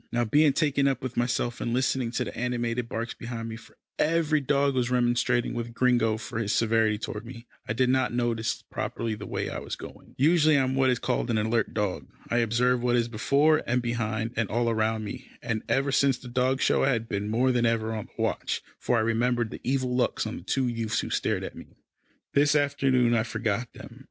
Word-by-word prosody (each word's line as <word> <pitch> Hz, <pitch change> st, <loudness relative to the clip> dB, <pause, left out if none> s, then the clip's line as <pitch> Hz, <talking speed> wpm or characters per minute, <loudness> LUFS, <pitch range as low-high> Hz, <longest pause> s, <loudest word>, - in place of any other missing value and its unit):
Now, 120 Hz, 0 st, +1 dB
being 150 Hz, +7 st, +4 dB
so -, -, 0 dB
taken 140 Hz, -1 st, +2 dB
up 135 Hz, -2 st, -1 dB
with 130 Hz, -2 st, -4 dB
myself, 120 Hz, 0 st, -1 dB
and 120 Hz, -, -1 dB
listening 130 Hz, -1 st, 0 dB
to -, -, 0 dB
the -, -, -7 dB
animated 120 Hz, -1 st, -2 dB
barks 115 Hz, +1 st, -3 dB
behind 115 Hz, -1 st, -6 dB
me, 110 Hz, -, -5 dB
for 115 Hz, -, -15 dB, 0.2 s
every 155 Hz, -1 st, +2 dB
dog 140 Hz, 0 st, +2 dB
was 125 Hz, -2 st, 0 dB
remonstrating 120 Hz, 0 st, +1 dB
with 120 Hz, -1 st, -5 dB
Gringo 120 Hz, -3 st, +2 dB
for 115 Hz, +1 st, -5 dB
his 110 Hz, -1 st, -1 dB
severity 110 Hz, -1 st, +2 dB
toward 105 Hz, 0 st, -5 dB
me, 120 Hz, 0 st, -10 dB, 0.2 s
I 110 Hz, -, -1 dB
did 125 Hz, +3 st, +2 dB
not 130 Hz, +1 st, +2 dB
notice 115 Hz, -2 st, -1 dB
properly 115 Hz, -1 st, -3 dB
the 105 Hz, -1 st, -7 dB
way -, -, -2 dB
I -, -, -4 dB
was -, -, -5 dB
going. -, -, -12 dB
Usually, 155 Hz, +1 st, +4 dB
I 135 Hz, -, +3 dB
am 130 Hz, 0 st, -1 dB
what 135 Hz, 0 st, +3 dB
is 125 Hz, -, +2 dB
called 125 Hz, 0 st, -1 dB
an 115 Hz, -, +1 dB
alert 110 Hz, +1 st, 0 dB
dog. 95 Hz, -10 st, -2 dB, 0.2 s
I 120 Hz, -, +2 dB
observe 120 Hz, +2 st, +2 dB
what 120 Hz, 0 st, +2 dB
is 120 Hz, -1 st, +1 dB
before, 140 Hz, +7 st, +3 dB
and 125 Hz, +1 st, +2 dB
behind, 115 Hz, -2 st, -2 dB
and 115 Hz, -2 st, 0 dB
all 115 Hz, +1 st, +1 dB
round 110 Hz, 0 st, 0 dB
me, 100 Hz, -, -7 dB
and 110 Hz, -2 st, -2 dB
ever 135 Hz, +1 st, +1 dB
since 135 Hz, -1 st, +3 dB
the 125 Hz, -, -12 dB
dog 130 Hz, +2 st, 0 dB
show, -, -, +3 dB
I 135 Hz, -, +3 dB
had 115 Hz, -1 st, -2 dB
been 100 Hz, 0 st, -3 dB
more 125 Hz, +4 st, +2 dB
than 120 Hz, -2 st, +2 dB
ever 115 Hz, -1 st, 0 dB
on 110 Hz, -1 st, -5 dB
the -, -, -24 dB
watch, -, -, -2 dB, 0.2 s
for 120 Hz, -, +1 dB
I -, -, +3 dB
remembered 115 Hz, +1 st, +1 dB
the -, -, -8 dB
evil 130 Hz, -1 st, 0 dB
looks 125 Hz, -2 st, 0 dB
of 110 Hz, -, -4 dB
the -, -, -7 dB
two 135 Hz, -2 st, 0 dB
youths 115 Hz, -2 st, -1 dB
who -, -, -5 dB
had -, -, -3 dB
stared -, -, 0 dB
at -, -, -6 dB
me. -, -, -13 dB, 0.6 s
This 145 Hz, +1 st, +4 dB
afternoon 135 Hz, -4 st, +2 dB
I 115 Hz, -, +3 dB
forgot 110 Hz, +1 st, -2 dB
them. -, -, -12 dB
120 Hz, 230 wpm, -27 LUFS, 115-130 Hz, 0.6 s, being